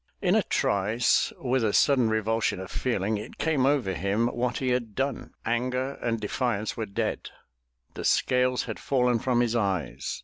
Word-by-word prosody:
In - - +2
a - - +4
trice 105 +4 +1
with 130 -1 0
a 105 -2 +1
sudden 130 -5 +4
revulsion 110 -2 0
of 95 - -7
feeling, 110 -4 -1
it 105 - -9
came 150 -5 +1
over 135 -9 +1
him 100 +6 0
what 125 0 -2
he 130 - -1
had 120 -4 -1
done. 135 -1 -3
Anger 125 +3 -1
and 115 -1 -1
defiance 110 0 -2
were 110 -2 -3
dead. 100 - -3 0.6
The - - -6
scales 125 0 +2
had - - -6
fallen 125 -3 +1
from 120 0 +1
his 120 -1 0
eyes. 95 - -2
120 Hz, 170 wpm, -27 LUFS, 105-125 Hz, 0.6 s, a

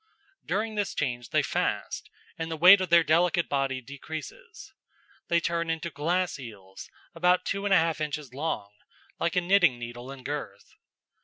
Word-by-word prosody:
During 215 +4 -1
this 205 -1 -2
change 120 -3 -2
they - - +2
fast, - - -2 0.3
and 165 0 -4
the 160 - -4
weight 185 +4 +8
of 185 - -2
their 170 0 +6
delicate 170 +2 +2
body 135 -2 -1
decreases. 160 - -9 0.5
They 170 - +3
turn 170 0 -1
into 165 +1 -2
glass 170 +4 -1
eels, 100 -6 -11 0.2
about 180 0 +2
2 200 - -2
1/2 165 -6 +2
inches 150 -3 -4
long, 135 -8 -3 0.5
like 170 - 0
a 180 - +3
knitting 175 -7 +4
needle 120 +2 -8
in 135 -2 -10
girth. 140 -8 -6
160 Hz, 155 wpm, -27 LUFS, 135-180 Hz, 0.5 s, weight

